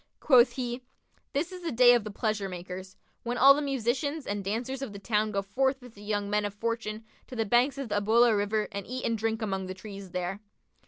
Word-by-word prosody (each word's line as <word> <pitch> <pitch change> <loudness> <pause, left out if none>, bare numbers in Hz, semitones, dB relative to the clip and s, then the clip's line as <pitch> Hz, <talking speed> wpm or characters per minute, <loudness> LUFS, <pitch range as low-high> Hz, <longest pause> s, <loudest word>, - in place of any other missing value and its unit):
Quoth 255 -4 +5
he, 245 -1 -3 0.5
'This 310 +6 -1
is 365 -1 -8
the 340 - -3
day 245 +1 +7
of 240 -3 +2
the 215 - -6
pleasure 210 -1 -2
makers, 185 +1 -8 0.2
when 240 +1 -3
all 275 +1 +9
the 290 - -1
musicians 275 +2 -1
and 200 0 -3
dancers 240 +7 -3
of 255 -7 -5
the - - -7
town 210 +1 0
go 200 -1 -1
forth 265 +7 0
with 245 -3 -13
the 205 - -15
young 205 -1 -2
men 210 +1 +1
of 205 -1 -4
fortune 225 0 -3 0.2
to 255 - -9
the 225 -1 0
banks 245 +6 +3
of 275 -4 -5
the 205 0 +1
Ubullah 230 +3 +5
river[FN#50] 210 +1 0
and 200 -1 -5
eat 255 +1 -4
and 230 - +1
drink 225 +1 -1
among 190 -3 -2
the 185 - -5
trees 200 -1 -9
there.' 180 +2 -3
220 Hz, 230 wpm, -28 LUFS, 200-250 Hz, 0.5 s, all